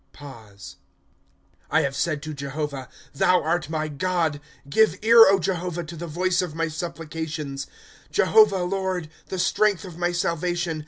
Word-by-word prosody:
''' - - -24 1.5
I - - +3
have 140 0 -2
said 155 -1 -1
to 155 0 -5
Jehovah: 140 -1 -5 0.2
Thou 180 +6 +3
art 165 +1 -1
my 155 -1 -2
God; 160 -1 -1 0.3
Give 220 +10 +3
ear, 230 0 +8
Jehovah, 175 -1 -2
to 165 +1 -9
the 170 +1 -6
voice 180 +3 0
of 175 -4 -5
my 165 0 -1
supplications. 160 -3 -5 0.4
'^ - - -33
Jehovah, 310 - +4
Lord, 185 -3 -2 0.2
the 190 - -5
strength 200 +2 +1
of 175 -2 -10
my 175 0 +1
salvation. 175 -1 -1
170 Hz, 150 wpm, -24 LUFS, 155-180 Hz, 1.5 s, ear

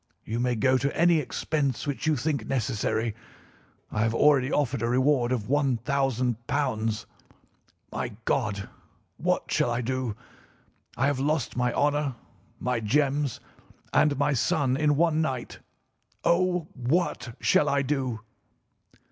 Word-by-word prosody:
You 115 +2 -3
may 125 0 +1
go 130 +3 +3
to 140 +3 -1
any 170 -1 +5
expense 145 -2 -1
which 145 +1 -3
you 155 - +3
think 140 -7 -2
necessary. 115 -2 -1 0.8
I 110 - -1
have 115 +1 +1
already 135 -1 +4
offered 135 -4 0
a 115 - 0
reward 130 0 +2
of 125 -4 0
£ - - -12 0.4
1000. 130 -4 +1 1.5
My - - -3
God, 100 -1 0 0.5
what - - 0
shall - - +2
I 120 +1 -1
do! 130 -2 -2 0.8
I 130 - +2
have 140 -2 +1
lost 145 -1 0
my 125 -1 +1
honour, 145 -2 +1 0.4
my 125 -1 0
gems, 140 +3 +1 0.5
and 145 -2 +3
my 145 +1 +2
son 130 +1 +1
in 150 +1 +2
one 160 0 +2
night. 130 -6 -3 0.6
Oh, 180 -1 +2
what 130 -2 -1
shall 145 - +3
I 140 0 +2
do!" 130 -5 -2
135 Hz, 135 wpm, -27 LUFS, 120-150 Hz, 1.5 s, any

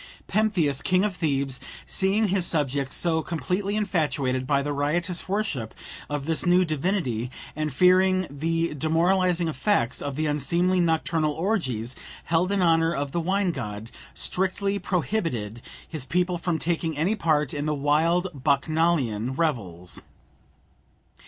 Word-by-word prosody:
Pentheus, 180 -11 +1
king 185 +1 +2
of 205 -3 -2
Thebes, 140 -6 0 0.3
seeing 200 +2 +2
his 185 -2 +1
subjects 140 -3 0
so 160 -2 +1
completely 185 +5 -2
infatuated 150 -10 0
by 140 -1 +2
the 145 0 -2
riotous 170 +6 -1
worship 190 - -2 0.3
of 145 -1 -3
this 160 0 +1
new 180 +1 +4
divinity, 155 - -1 0.3
and 155 0 -2
fearing 185 +5 +4
the 165 +3 -1
demoralizing 170 +3 +2
effects 150 - +1
of 140 -2 -4
the 155 +2 -1
unseemly 170 +5 +1
nocturnal 160 -2 +1
orgies 135 - -1 0.3
held 175 +4 +1
in 200 -2 +2
honour 165 -1 +3
of 140 0 -2
the 170 - -1
wine 190 +2 +1
god, 110 -5 -6 0.2
strictly 195 +2 0
prohibited 160 - -2 0.3
his 155 -5 -3
people 180 +3 0
from 170 -1 -1
taking 165 -2 -1
any 170 +8 +2
part 155 - +1
in 145 0 -2
the 150 - 0
wild 160 +6 +2
Bacchanalian 140 -4 +1
revels. 100 - -2
160 Hz, 135 wpm, -25 LUFS, 140-180 Hz, 0.3 s, new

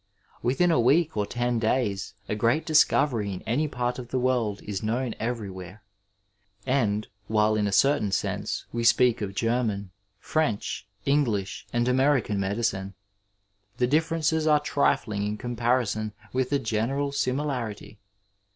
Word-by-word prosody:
Within 155 +9 +2
a 145 - +3
week 145 +6 +3
or 105 -1 0
ten 120 0 -1
days 110 -4 -1
a - - -2
great 115 +9 +1
discovery 135 -8 +3
in 90 - -7
any 140 +7 0
part 125 -2 -2
of 125 - -7
the 130 - -2
world 125 -5 0
is 100 -3 -4
known 115 +2 -1
everywhere, 100 -4 -5 0.8
and, 110 -6 +1 0.2
while 110 0 +3
in 105 -1 +1
a - - -1
certain 135 -2 +3
sense - - -2
we 120 0 -1
speak 120 0 +4
of 100 -1 -4
German, 115 -5 -1 0.3
French, 115 -2 -2 0.2
English, 110 -10 0
and 120 0 +1
American 125 -5 +2
medicine, 100 -1 -1 0.8
the 125 - +2
differences 160 +2 +1
are 150 -1 +5
trifling 135 -7 0
in 105 +1 -2
comparison 120 -2 -1 0.2
with 130 0 0
the 145 - +2
general 135 +4 -1
simi 140 0 0
larity. 115 -7 -4
120 Hz, 140 wpm, -26 LUFS, 105-135 Hz, 0.8 s, are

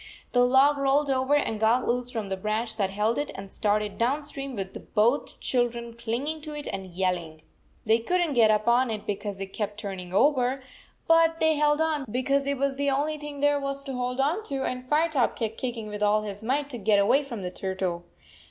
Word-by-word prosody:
The 245 -1 +4
log 270 +3 +4
rolled 275 +1 +2
over 260 +2 +2
and 225 -7 0
got 230 +3 +2
loose 245 +1 0
from 225 -5 -4
the 190 - -1
branch 215 +3 -2
that 195 -3 +1
held 210 +5 0
it 290 - -2
and 195 0 -8
started 210 -1 -1
down 270 +6 +1
stream, 275 -2 -6
with 195 -2 -7
both 235 +7 +2
children 235 -2 -1
clinging 240 +7 -3
to 300 0 -7
it 295 - -6
and 195 -1 -5
yelling. 175 -3 -2 0.4
They 225 +1 +4
could 360 +11 0
n 345 -2 +1
t - - -2
get 230 -4 +5
up 215 0 +2
on 245 +1 +4
it 215 -2 -4
because 205 -1 -4
it 195 0 -6
kept 210 -1 -3
turning 190 -4 -6
over, 255 +4 +3 0.5
85 - - -39
but 330 0 +4
they 315 0 +4
held 295 0 +2
on 310 -4 0
because 275 +4 0
it 280 0 0
was 275 0 0
the 285 0 +1
only 295 +3 0
thing 290 -1 -7
there 290 0 +3
was 275 0 -3
to 275 -1 -6
hold 250 +1 -3
on 305 +10 +1
to, 275 -5 -3
and 255 0 -4
Firetop 300 -4 +2
kept 225 -1 -3
kicking 235 -4 -4
with 210 0 -6
all 210 +1 +3
his 205 0 -6
might 275 +5 0
to 240 - -5
get 205 0 +3
away 200 +8 +4
from 240 -8 -7
the 180 - -4
turtle. 185 -2 -3
245 Hz, 225 wpm, -26 LUFS, 210-280 Hz, 0.5 s, get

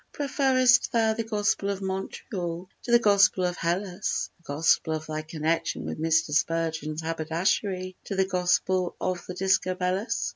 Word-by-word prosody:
"Preferrest 260 -3 +3
thou 225 -2 +3
the 225 +1 -3
gospel 205 -2 0
of 200 -1 -2
Montreal 190 -2 -4
to 240 - -5
the 240 - +8
gospel 200 -4 +4
of 180 -1 -1
Hellas, 180 +3 -2
The - - -30
gospel 160 +1 +2
of 155 0 -6
thy 155 0 -4
connection 160 +1 -2
with - - -5
Mr. 160 -1 +2
Spurgeon's 160 0 -1
haberdashery 180 +4 -1
to 195 - -4
the 190 0 +2
gospel 180 0 +1
of 180 -1 -2
the 180 - -6
Discobolus?" 185 +2 0
185 Hz, 150 wpm, -26 LUFS, 165-200 Hz, -, the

